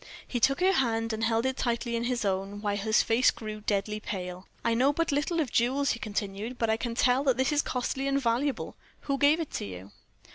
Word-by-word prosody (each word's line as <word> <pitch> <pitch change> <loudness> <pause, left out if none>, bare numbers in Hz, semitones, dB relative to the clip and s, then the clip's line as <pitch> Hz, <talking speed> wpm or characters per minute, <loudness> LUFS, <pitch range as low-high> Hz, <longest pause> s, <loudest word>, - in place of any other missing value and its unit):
He 245 - -2
took 275 +7 +2
her 375 +1 +5
hand 225 -6 +1
and 220 +1 -3
held 225 +1 +1
it 265 0 -1
tightly 235 -1 -1
in 230 0 -1
his 240 -3 -1
own, 195 +1 -2
while 205 -1 -1
his 215 +2 +2
face 230 +3 +4
grew 215 -1 -5
deadly 210 0 -1
pale. 180 -3 -6 0.2
"I 230 - +3
know 260 +5 +3
but 330 +2 0
little 295 +4 0
of 285 -7 -1
jewels," 265 +4 +2
he 230 - -3
continued, 210 +2 -4
"but 230 -2 +1
I - - +3
can 230 0 -4
tell 250 +2 +3
that 260 -3 +3
this 265 +3 +2
is 295 0 +3
costly 265 +1 -2
and 275 0 +2
valuable. 255 +3 -1 0.3
Who 275 -1 -2
gave 290 +3 +5
it 325 - -4
to - - -3
you?" 95 +1 -9
235 Hz, 230 wpm, -28 LUFS, 215-270 Hz, 0.3 s, her